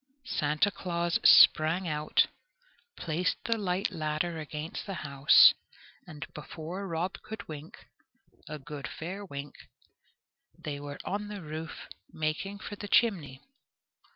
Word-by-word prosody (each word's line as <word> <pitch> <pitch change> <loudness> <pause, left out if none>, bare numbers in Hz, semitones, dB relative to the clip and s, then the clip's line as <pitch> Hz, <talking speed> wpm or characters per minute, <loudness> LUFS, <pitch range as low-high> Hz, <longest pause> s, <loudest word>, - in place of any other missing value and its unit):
Santa 155 -1 +1
Claus 170 -3 -1
sprang 165 +4 +7
out, 150 -1 +2 0.7
placed 170 +2 -1
the 230 - +1
light 195 -3 -1
ladder 155 +2 -2
against 155 +4 -6
the 195 - -4
house, 140 -1 +7 0.5
and 160 -2 -7
before 165 +6 -6
Rob 170 +2 -3
could 215 -2 -8
wink 155 0 -10 0.6
a 150 - -5
good 145 0 -7
fair 185 +5 -6
wink 140 -6 -7 1.0
they 150 -4 -5
were 145 0 -7
on 205 +2 -3
the 205 -3 -7
roof 155 +1 -7 0.2
making 155 +6 -3
for 205 - -7
the 205 - -7
chimney. 170 - +2
160 Hz, 125 wpm, -30 LUFS, 150-190 Hz, 1.0 s, sprang